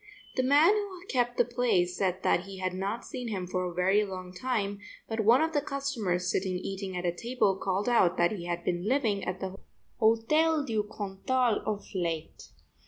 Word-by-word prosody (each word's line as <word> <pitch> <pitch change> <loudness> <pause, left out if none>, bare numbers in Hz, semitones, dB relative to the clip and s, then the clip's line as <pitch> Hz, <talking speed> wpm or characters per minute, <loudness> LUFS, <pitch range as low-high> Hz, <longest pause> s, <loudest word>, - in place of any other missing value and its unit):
The - - +2
man 290 +9 +5
who 400 -4 -4
kept 245 -1 0
the 245 - +4
place 235 -8 +1
said 185 -1 -1
that 175 - +2
he 195 -1 -9
had 185 -1 -2
not 195 +5 -3
seen 250 -2 -5
him 195 -5 -3
for 185 0 -2
a 180 - -3
very 190 +3 +3
long 185 -2 -7
time, 205 -2 -2 0.3
but 225 0 -3
one 230 +7 +5
of 320 0 -1
the 290 - +2
customers 235 -11 -1
sitting 185 -1 0
eating 190 0 -5
at 180 - -3
a 175 - +1
table 220 0 +1
called 195 +2 -1
out 185 -7 +4
that 175 0 +3
he 185 -5 -5
had 175 0 -3
been 175 +2 -1
living 225 -6 +1
at 185 0 -3
the 190 0 -4 0.4
Hotel 290 +8 +3
du 220 -5 0 0.2
Cantal 220 +4 0
of 210 -1 -2
late. 170 -4 -3
205 Hz, 195 wpm, -29 LUFS, 185-245 Hz, 0.4 s, man